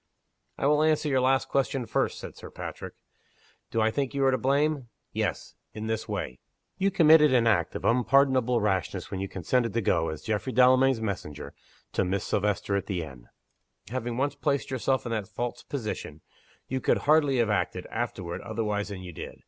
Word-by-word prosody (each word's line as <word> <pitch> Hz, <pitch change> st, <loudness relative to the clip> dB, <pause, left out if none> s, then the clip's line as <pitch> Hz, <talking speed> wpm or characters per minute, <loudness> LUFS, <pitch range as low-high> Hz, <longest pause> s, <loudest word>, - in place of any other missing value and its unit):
"I -, -, -2 dB
will 150 Hz, +1 st, +4 dB
answer 155 Hz, -1 st, +2 dB
your 135 Hz, -3 st, +2 dB
last 130 Hz, +1 st, +2 dB
question 135 Hz, -2 st, 0 dB
first," -, -, 0 dB
said -, -, -8 dB
Sir -, -, -10 dB
Patrick. -, -, -7 dB, 0.7 s
"Do 115 Hz, -, 0 dB
I 110 Hz, 0 st, +3 dB
think 140 Hz, +2 st, -2 dB
you 135 Hz, -1 st, +2 dB
are 135 Hz, -, +5 dB
to 130 Hz, -, +2 dB
blame? 140 Hz, 0 st, +1 dB, 0.3 s
Yes -, -, -2 dB, 0.2 s
in 110 Hz, 0 st, -5 dB
this 110 Hz, 0 st, -3 dB
way. 65 Hz, -, -4 dB, 0.4 s
You 195 Hz, +1 st, +3 dB
committed 160 Hz, -5 st, +6 dB
an 120 Hz, -2 st, +4 dB
act 100 Hz, -8 st, +2 dB
of -, -, -4 dB
unpardonable 125 Hz, -1 st, +3 dB
rashness 95 Hz, -4 st, -1 dB
when 95 Hz, -, -3 dB
you 95 Hz, -, -2 dB
consented 115 Hz, +6 st, 0 dB
to 115 Hz, -, +1 dB
go, 85 Hz, -4 st, +1 dB
as 80 Hz, -1 st, -6 dB
Geoffrey 110 Hz, +4 st, -2 dB
Delamayn's 130 Hz, 0 st, +5 dB
messenger, 90 Hz, -8 st, -5 dB, 0.4 s
to -, -, +2 dB
Miss 95 Hz, +1 st, -1 dB
Silvester 105 Hz, -1 st, 0 dB
at 100 Hz, -, -2 dB
the 90 Hz, -4 st, -2 dB
inn. 65 Hz, -5 st, -11 dB, 0.6 s
Having 120 Hz, -1 st, -3 dB
once 140 Hz, +2 st, 0 dB
placed 140 Hz, -1 st, -1 dB
yourself 130 Hz, 0 st, 0 dB
in 120 Hz, -, -4 dB
that 110 Hz, -3 st, -2 dB
false 120 Hz, +3 st, -4 dB
position, 105 Hz, -, -5 dB, 0.5 s
you 130 Hz, 0 st, -2 dB
could -, -, +3 dB
hardly 145 Hz, -3 st, +4 dB
have 115 Hz, -3 st, +2 dB
acted, 105 Hz, -, -1 dB
afterward, 85 Hz, -2 st, -4 dB
otherwise 105 Hz, -2 st, -2 dB
than 100 Hz, -3 st, -7 dB
you 90 Hz, -2 st, -8 dB
did. -, -, -7 dB
120 Hz, 190 wpm, -27 LUFS, 100-135 Hz, 0.7 s, committed